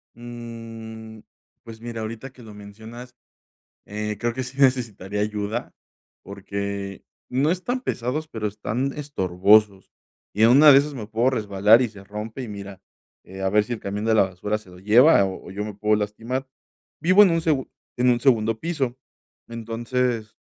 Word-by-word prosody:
Mm, 115 -2 -9 0.4
pues, 115 -1 -11
mira, 115 -1 -6
ahorita 115 +4 -6
que 125 -1 -16
lo 110 -2 -11
mencionas, 110 +4 -11 0.7
eh, 105 0 -4
creo 120 +1 -1
que 130 +2 -3
sí 130 +2 -9
necesitaría 110 -7 +1
ayuda, 105 +2 -3 0.5
porque 100 0 -5 0.3
no 135 +5 +1
están 245 +8 -2
pesados, 140 - -3
pero 110 -7 -3
están 110 +6 -3
estorbosos 100 -6 +2 0.4
y 105 - +2
en 115 - +7
una 145 +4 +8
de 135 - +8
esas 145 +1 -3
me 115 -6 -7
puedo 115 +4 +1
resbalar 105 -1 +4
y 125 - 0
se 100 -2 -13
rompe, 105 +5 -6
y - - -6
mira, 100 -2 -9 0.6
a 95 - +2
ver 105 +2 +3
si 120 - -4
el 115 - -5
camión 100 +2 -4
de 110 0 +3
la 105 - +6
basura 95 +3 -3
se 105 -3 -16
lo 90 0 -14
lleva 110 - +6
o 95 -1 -6
o - - -9
yo 100 +2 -4
me 105 - -6
puedo 105 +1 +2
lastimar. 115 +6 -3 0.5
Vivo 185 +6 +6
en 195 - +5
un 165 0 +1
segu 150 -5 0 0.3
en 125 +1 +3
un 120 -1 +3
segundo 115 -4 +2
piso, 135 -6 -2 0.5
entonces, 115 0 -3
110 Hz, 175 wpm, -23 LUFS, 105-125 Hz, 0.7 s, una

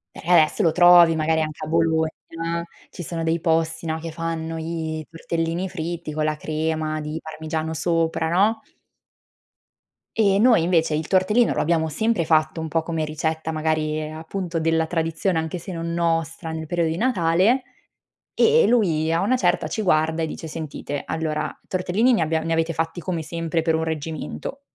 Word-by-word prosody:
Eh, 175 0 +4
esso 155 - -2
lo 165 -5 +3
trovi 175 -1 +7
magari 160 0 +1
anche 155 -1 -4
a - - -4
Bologna, 160 -1 +2 0.8
ci - - -9
sono 165 0 -4
dei 165 +1 +1
posti, 165 0 0
no, 160 0 -1
che 165 0 -6
fanno 165 0 -4
i 160 -1 -4
tortellini 165 +2 -2
fritti 170 -2 -5
con 155 0 -1
la 155 0 0
crema 155 0 -2
di 150 +1 -4
parmigiano 160 0 -4
sopra, 165 0 0
no? 210 +6 +2 1.5
E 200 -3 +3
noi 230 -4 +5
invece 165 -2 +2
il 155 +1 -2
tortellino 210 +5 +3
lo - - 0
abbiamo 160 0 +1
sempre 205 +3 0
fatto 155 +1 +2
un 160 - -3
po' 165 +1 0
come 160 -1 -2
ricetta 160 +1 -2
magari 155 0 0
appunto 165 +2 -4
della 160 0 +1
tradizione 165 +2 -1
anche 160 +2 -2
se 180 +3 -8
non 170 -1 -4
nostra 165 -1 -1
nel 160 0 -5
periodo 170 0 0
di 160 - -2
Natale, 200 +2 +2 0.7
e 460 +1 +5
e - - +4
lui 165 -9 +2
a 165 - +2
una 250 +6 +2
certa 180 -6 +1
ci 220 - -3
guarda 160 -3 +2
e 160 - -1
dice: 160 - -7
"Sentite 155 -2 -5
allora 155 -1 -2
tortellini 190 +7 +1
ne 220 - +2
abbia 160 0 +1
ne 165 +1 -2
avete 165 0 +1
fatti 165 +2 -3
come 170 -2 -3
sempre 165 +1 -2
per 160 -1 +1
un 160 - 0
reggimento." 160 - -5
165 Hz, 175 wpm, -23 LUFS, 160-175 Hz, 1.5 s, trovi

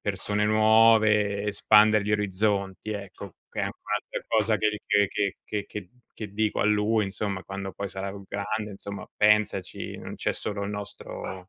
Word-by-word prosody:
persone 105 +1 -1
nuove, 110 -1 +4
espandere 105 0 +4
gli 105 - 0
orizzonti, 100 0 0
ecco, 100 -2 -8 0.2
che - - -9
è - - -1
anche - - -5
un'altra - - -3
cosa, 110 -1 +2
che 105 0 0
che 100 -2 +3
che 100 -2 0
che 105 -1 -3
che 105 -4 -7 0.3
che 105 -3 -7
dico 110 0 0
a - - +1
lui 105 +1 +2
insomma, 95 -1 -3
quando 95 0 -6
poi 100 -1 -5
sarà 95 0 -4 0.2
grande: 105 +1 -3
"Insomma, 100 0 -7
pensaci, 105 -3 +1
non - - -7
c'è - - -1
solo 100 -1 -4
il 100 - -4
nostro 100 -2 -7
105 Hz, 165 wpm, -26 LUFS, 100-105 Hz, 0.3 s, nuove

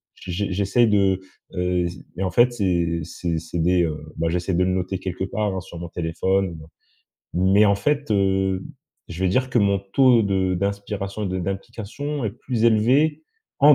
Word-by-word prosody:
j'e 90 - -8
j'e 100 +4 -1
j'essaye 100 +5 +2
de, 95 -2 +2 0.3
heu, 90 -1 0
c 90 +1 -10 0.2
et 95 - -1
en 90 - -1
fait, 120 +6 +4
c'est 85 -5 0
c'est 85 0 -3
c'est 85 +1 -5
des, 90 +1 +3
heu, 75 -2 -1 0.2
bah 80 - 0
j'essaie 90 +2 -1
de 90 - +3
le 90 - +1
noter 95 +1 -1
quelque 95 0 -3
part, 105 +1 -2
hein - - -2
sur 85 - -11
mon 85 - -6
téléphone. 85 +2 -1 0.8
Mais 95 +4 +4
en 100 - +4
fait, 145 +2 -1
heu, 95 -1 +1 0.5
je 85 +2 -6
vais - - +3
dire 130 +4 +1
que 125 - +2
mon 100 -1 +3
taux 115 +4 +4
de 95 -2 +1
d'inspiration 100 +1 -3
et - - -1
de 95 - -2
d'implication 115 - -4
est 105 - 0
plus 120 -1 -2
élevé 130 +8 +3 0.4
en 145 +1 +8
95 Hz, 190 wpm, -23 LUFS, 90-110 Hz, 0.8 s, en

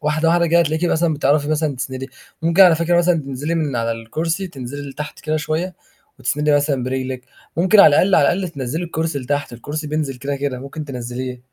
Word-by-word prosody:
واحدة 155 +2 +1
واحدة 170 0 +3
كده 170 +1 +4
هتلاقيكِ 160 +1 0
مثلًا 160 -1 +2
بتعرفي 145 +1 +1
مثلًا 155 -3 0
تسندي، 130 0 -5 0.3
ممكن 170 +4 +5
على 175 -3 +7
فكرة 170 +2 +2
مثلًا 175 0 +3
تنزِلي 140 +4 -3
من 150 -6 -1
على 115 0 0
الكرسي 160 +11 -3
تنزِلي 140 0 -7
لتحت 150 +2 -7
كده 155 0 -1
شوية 160 +4 -2 0.4
وتسندي 150 +2 0
مثلًا 140 -3 0
برجلِك، 130 0 -3 0.3
ممكن 190 +4 +5
على - - +9
الأقل 185 +6 +4
على - - +5
الأقل 185 0 -2
تنزِّلي 145 +3 -4
الكرسي 160 -2 -2
لتحت، 140 0 -2
الكرسي 150 +6 -5
بينزِل 150 -3 -2
كده 140 +2 -3
كده 135 -2 -3
ممكن 140 +3 -7
تنزِّليه. 125 -1 -6
150 Hz, 195 wpm, -20 LUFS, 135-165 Hz, 0.4 s, على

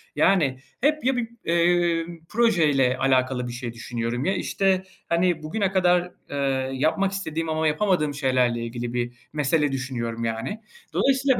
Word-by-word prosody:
Yani, 145 -10 +3 0.2
hep 305 -1 +2
ya 265 - +3
bir, 235 -2 -2 0.2
eee, 170 -1 +2 0.2
projeyle 155 - +3
alakalı 130 -1 +1
bir 120 - -6
şey 120 -1 -5
düşünüyorum 115 +1 -3
ya, 190 - +2
işte, 190 -1 +1 0.3
hani, 170 -2 +1
bugüne 195 +4 -1
kadar, 180 -1 +2 0.2
ııı, 135 -2 -1
yapmak 190 +8 +1
istediğim 165 -4 -3
ama 160 0 +1
yapamadığım 155 -2 +1
şeylerle 130 -4 +1
ilgili 120 0 -5
bir 120 0 -4
mesele 150 0 +1
düşünüyorum, 120 -3 -3
yani. 115 - -3 0.3
Dolayısıyla 270 -1 +3
150 Hz, 140 wpm, -24 LUFS, 130-185 Hz, 0.3 s, Yani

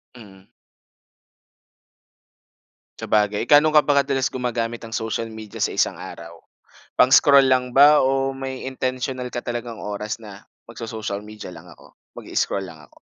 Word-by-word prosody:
Mm. 95 -5 -15 2.6
Sabagay, 105 -1 0
gaano 150 +1 +6
ka 150 - +7
ba 145 -1 +3
kadalas 135 -2 0
gumagamit 120 -2 -3
ng 115 - -10
social 110 0 -2
media 110 -2 -10
sa - - -1
isang - - 0
araw? 85 0 -10 0.6
Pang-scroll 135 +2 +6
lang 130 -1 +2
ba 145 +4 +6
o 135 0 +1
may 135 -1 -6
intensiyonal 130 -1 -3
ka 120 - -6
talagang 120 -1 -5
oras 105 +2 -5
na, 105 -2 -12 0.2
"Magso-social 110 -3 -6
media 105 0 -10
lang - - -13
ako, - - -18 0.2
mag-i-scroll 100 -1 -2
lang 80 -4 -12
ako." 70 - -21
120 Hz, 135 wpm, -22 LUFS, 105-135 Hz, 2.6 s, ka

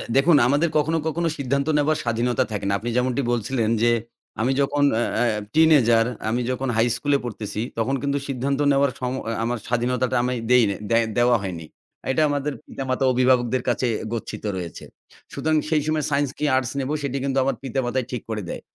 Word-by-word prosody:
দেখুন 145 +3 +5
আমাদের 145 +6 +2
কখনো, 155 +2 +1
কখনো 170 +2 -1
সিদ্ধান্ত 140 +2 -1
নেওয়ার 150 +1 +2
স্বাধীনতা 120 +2 +1
থাকে 105 -1 -3
না। 100 - +1
আপনি 120 - -4
যেমনটি 125 +2 +1
বলছিলেন 115 -1 0
যে 120 - +5 0.5
আমি 125 +4 +2
যখন 145 +1 +1 0.2
আ 120 0 0 0.3
teenager 135 -8 +5 0.3
আমি 120 +2 0
যখন 130 +1 -2
high 115 +1 +3
school 145 0 -1
এ - - -7
পড়তেছি, 105 -2 -5 0.2
তখন 120 +4 0
কিন্তু 140 0 0
সিদ্ধান্ত 135 +1 -1
নেওয়ার 140 0 +3
সময- 130 0 -3 0.2
আমার 120 +1 -1
স্বাধীনতাটা 125 +1 0
আমি 125 - 0 0.2
দেই 125 -1 +6 0.5
দেওয়া 120 0 +4
হয়নি। 85 -4 -5 0.5
এটা 155 - +1
আমাদের 145 0 -1
পিতামাতা 130 0 -3
অভিভাবকদের 125 0 +2
কাছে 125 - 0 0.3
গচ্ছিত 115 - -5
রয়েছে। 85 -2 -7 0.5
সুতরাং 155 0 0
সেই 155 -2 +2
সময় 155 -1 0
science 140 -1 +1
কি 150 - -1
arts 130 -1 -1
নেব 135 - -2
সেটি 140 -1 -2
কিন্তু 135 -1 -1
আমার 135 -1 0
পিতা 135 0 -2
মাতাই 125 +1 -1
ঠিক 125 -3 -3
করে 110 -1 -2
দেয়। - - -5
130 Hz, 180 wpm, -23 LUFS, 120-140 Hz, 0.5 s, দেই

